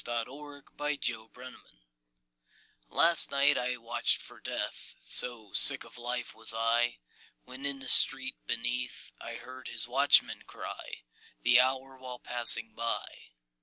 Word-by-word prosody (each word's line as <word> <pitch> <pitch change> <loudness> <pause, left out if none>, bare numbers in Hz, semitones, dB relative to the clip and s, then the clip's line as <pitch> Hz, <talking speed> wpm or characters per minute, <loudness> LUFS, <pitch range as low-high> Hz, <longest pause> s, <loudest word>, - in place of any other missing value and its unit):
TIME 120 - -3
AND 145 +1 -13
DEATH 145 -2 -3
AND 110 -1 -11
LOVE. 130 0 -12 1.3
Last 170 +1 +6
night 140 +1 +2
I 125 0 -3
watched 115 0 -1
for - - -11
Death - - -7
So 115 -5 0
sick - - +5
of - - -16
life 120 +1 -6
was 110 0 -1
I! 120 +1 -1 0.5
When 130 +2 -8
in 140 -1 -5
the 135 - -9
street - - +4
beneath 125 +2 -5
I - - -8
heard 130 0 -12
his - - 0
watchman 135 +4 +2
cry - - -10 0.4
The 120 +1 +4
hour, 130 +1 -4
while 125 -1 -10
passing 115 -2 +4
by. 115 +1 -6
125 Hz, 140 wpm, -28 LUFS, 120-135 Hz, 1.3 s, Last